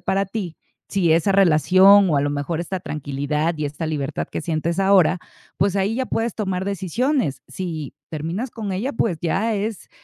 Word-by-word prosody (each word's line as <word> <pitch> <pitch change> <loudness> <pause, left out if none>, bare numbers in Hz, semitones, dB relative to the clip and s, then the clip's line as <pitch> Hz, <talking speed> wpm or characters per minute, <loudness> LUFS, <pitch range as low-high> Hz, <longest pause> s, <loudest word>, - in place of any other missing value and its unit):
para 195 +1 0
ti, 190 -4 -5 0.3
si 175 -5 +2
esa 170 +5 +3
relación 190 +2 +6
o, 150 - +2
a 140 - +2
lo 145 - 0
mejor, 145 +3 -2
está 185 +2 -4
tranquilidad 150 +2 -2
y 150 - -1
esta 145 +3 -5
libertad 145 -3 -3
que - - -5
sientes 165 +2 -2
ahora, 190 -2 +4 0.4
pues, 200 0 +2
ahí 200 +3 0
ya 260 0 -1
puedes 225 -1 -1
tomar 190 -3 -2
decisiones. 200 - -1
Si 165 -6 -5 0.2
terminas 165 - -4
con 215 -4 -5
ella, 225 +10 -2
pues, 190 -7 0
ya 205 +7 0
es, 210 0 -4
185 Hz, 180 wpm, -22 LUFS, 155-200 Hz, 0.4 s, relación